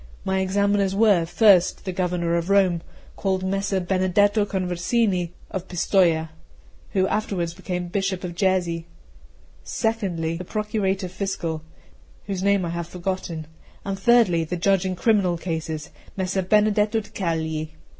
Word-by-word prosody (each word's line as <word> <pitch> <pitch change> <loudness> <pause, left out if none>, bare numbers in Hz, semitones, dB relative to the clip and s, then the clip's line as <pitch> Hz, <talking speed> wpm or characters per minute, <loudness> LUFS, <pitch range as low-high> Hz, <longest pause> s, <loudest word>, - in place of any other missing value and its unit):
My 190 0 +1
examiners 200 0 +1
were, 200 -6 +4
first, 190 -1 +4
the 190 - -2
Governor 180 -2 -1
of 170 +2 -1
Rome, 190 -4 +3 0.3
called 190 -1 -1
Messer 195 0 0
Benedetto 195 +3 +2
Conversini 185 0 0 0.2
of 190 -1 -4
Pistoja, 170 -3 +2 0.6
who 190 -1 +3
afterwards 185 -6 -1
became 180 -1 -4
Bishop 195 0 -2
of 175 -1 -4
Jesi; 175 -3 0 0.8
secondly, 180 -8 -1
the 180 - -6
Procurator 200 -1 -1
Fiscal, 180 -4 -3 0.6
whose 195 -2 -3
name 200 -1 +2
I - - -3
have 170 0 -4
forgotten; 175 -3 -4 0.4
and, 195 -1 -3
thirdly, 205 -7 +4
the 175 +3 -3
judge 190 +1 +2
in 185 - -2
criminal 190 -3 +2
cases, 160 -3 -4 0.3
Messer 190 0 0
Benedetto 210 +3 +2
da 205 - -15
Cagli. 160 -5 -2
185 Hz, 135 wpm, -24 LUFS, 170-200 Hz, 0.8 s, were